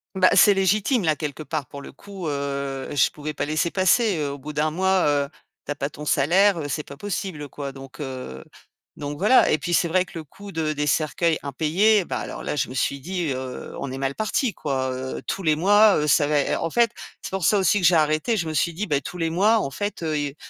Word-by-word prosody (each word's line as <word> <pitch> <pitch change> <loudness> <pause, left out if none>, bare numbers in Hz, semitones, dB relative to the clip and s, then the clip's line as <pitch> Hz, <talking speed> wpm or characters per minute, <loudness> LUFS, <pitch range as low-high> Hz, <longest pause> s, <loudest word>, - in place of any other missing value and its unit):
Ben, 185 -1 +5
c'est 205 - +7
légitime 205 +4 +1
là 155 -1 +2
quelque 150 0 -5
part 140 -1 -3
pour 140 +2 -10
le - - -10
coup, 195 +2 -8
heu, 140 -1 -3
je 130 - +4
pouvais 150 0 -6
pas 145 - -2
laisser 155 +3 0
passer, 190 +1 +3
heu, 145 -2 -1
au 140 - -7
bout 150 +3 -8
d'1 150 +1 +1
mois, 190 +1 +2
heu, 145 -1 +1 0.4
tu - - -4
as - - -2
pas 140 0 -3
ton 150 +1 -9
salaire, 175 +7 +3
heu, 145 - -4
c'est 150 +3 -2
pas 140 - -11
possible, 175 -5 -4
quoi, 140 0 -6
donc, 135 0 -12
heu, 130 - -6 0.5
donc, 145 0 -5
voilà, 215 +7 +5
et - - +3
puis 175 - -3
c'est 170 - +3
vrai 185 +2 +2
que - - -17
le 160 - -7
coût 200 +7 -12
de 155 -2 -1
des 150 0 -2
cercueils 160 +2 +1
impayés, 175 +8 +2
ben - - -3
alors - - -6
là - - -3
je 145 - -1
me 130 - -8
suis 140 +2 0
dit, 175 -1 -3
heu: 130 0 -6
«On 135 - -4
est 130 - -5
mal 135 0 -1
parti, 215 +2 0
quoi!», 130 -3 -2
heu, 130 +1 -5
tous 195 - -3
les 155 -1 +3
mois, 205 +5 +5
heu, 150 - 0
ça 145 0 +4
va 150 -1 +2
ê - - -1
en 165 - -2
fait, 235 +5 +2 0.3
c'est - - -6
pour 190 -2 -3
ça 210 - +4
aussi 195 +1 +2
que 175 - +5
j'ai 175 - +4
arrêté. 155 +9 +2
Je 170 - -2
me 160 - -3
suis 170 +2 +1
dit: 205 +6 -3
«Bah 145 -1 +1
tous 180 - -8
les 165 -1 -1
mois 210 +6 +3
en 140 - -3
fait, 205 -1 -4
heu, 155 -1 -1
i 145 -1 -3
155 Hz, 260 wpm, -23 LUFS, 140-190 Hz, 0.5 s, c'est